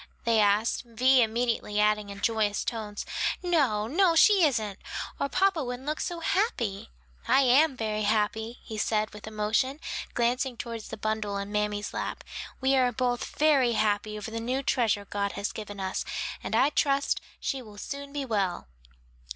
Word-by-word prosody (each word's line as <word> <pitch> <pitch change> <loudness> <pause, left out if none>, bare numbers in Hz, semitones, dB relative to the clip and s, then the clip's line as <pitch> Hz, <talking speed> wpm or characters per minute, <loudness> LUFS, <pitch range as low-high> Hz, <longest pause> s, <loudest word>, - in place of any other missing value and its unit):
they 230 -1 +3
asked, 210 +2 +2
Vi 255 +2 +4
immediately 230 -2 0
adding 210 -1 +2
in 200 0 -8
joyous 215 -3 +1
tones, 215 -3 -4 0.4
"No, 275 -12 +2
no, 335 - +3
she 395 +2 +6
isn't, 215 -9 +1 0.4
or 280 - 0
papa 385 -3 +2
wouldn't 250 +1 -5
look 305 +1 -2
so 345 -1 -3
happy." 235 - -1 0.4
"I 260 +3 +5
am 270 +2 +4
very 215 -2 -1
happy," 215 +2 0
he 220 -1 -6
said 215 0 0
with 210 0 -10
emotion, 220 +6 0 0.4
glancing 245 +1 0
toward 230 -1 -5
the - - -7
bundle 215 -1 -2
in 200 +1 -5
mammy's 210 0 -1
lap, - - -4 0.4
"we 265 +1 +3
are 255 -2 +3
both 245 0 -2
very 280 -6 +4
happy 210 0 0
over 210 +1 -6
the 230 - -3
new 255 +4 -2
treasure 225 -7 +1
God 200 0 -2
has 200 - -3
given 205 -2 -7
us; 190 0 -2 0.4
and - - -2
I 280 +3 +4
trust 280 -1 +1 0.2
she 270 - -2
will 210 -4 -13
soon 280 +5 -6
be 285 -1 -3
well." 195 - -1
230 Hz, 165 wpm, -28 LUFS, 210-265 Hz, 0.4 s, she